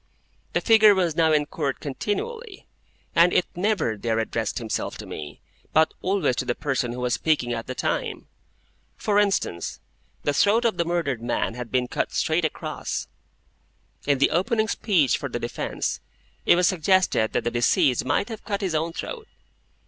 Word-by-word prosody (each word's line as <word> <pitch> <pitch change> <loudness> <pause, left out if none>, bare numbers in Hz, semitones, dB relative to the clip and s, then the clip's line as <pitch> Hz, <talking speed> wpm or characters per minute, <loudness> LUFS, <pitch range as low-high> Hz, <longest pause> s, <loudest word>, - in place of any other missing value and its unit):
The - - +1
figure 220 -3 +6
was 175 -4 +1
now 160 -1 +3
in 150 -1 +3
Court 145 -2 -3
continually, 405 - -4 0.5
and 170 +1 +6
it 180 - +3
never 185 - 0
there 110 +2 -1
addressed 115 -1 -2
itself 110 -2 -3
to - - -8
me, 75 -2 -8 0.3
but 160 0 +4
always 185 -9 +1
to 130 - -1
the 120 -1 -1
person 130 -4 -1
who 125 +1 -5
was 125 -1 0
speaking 145 -7 +1
at 115 -1 -5
the 130 - -4
time. - - -2 0.7
For 205 -1 +2
instance: 195 - 0 0.4
the 145 - +1
throat 220 +9 +3
of 220 -6 +1
the 170 - +1
murdered 165 -8 -1
man 120 -1 -1
had 125 -1 -7
been 125 -1 +1
cut - - -2
straight - - +1
across. - - -4 1.0
In 140 -1 +3
the 140 - +3
opening 220 +6 +1
speech 175 - +2
for - - -4
the - - -3
defence, - - -3 0.5
it - - +7
was 180 0 +3
suggested 185 - +2
that 120 - 0
the 120 - -1
deceased 120 +1 +2
might 145 - 0
have 225 -2 -7
cut 205 -1 -3
his 190 -4 -1
own 160 +2 -1
throat. 450 - -6
160 Hz, 175 wpm, -24 LUFS, 125-200 Hz, 1.0 s, it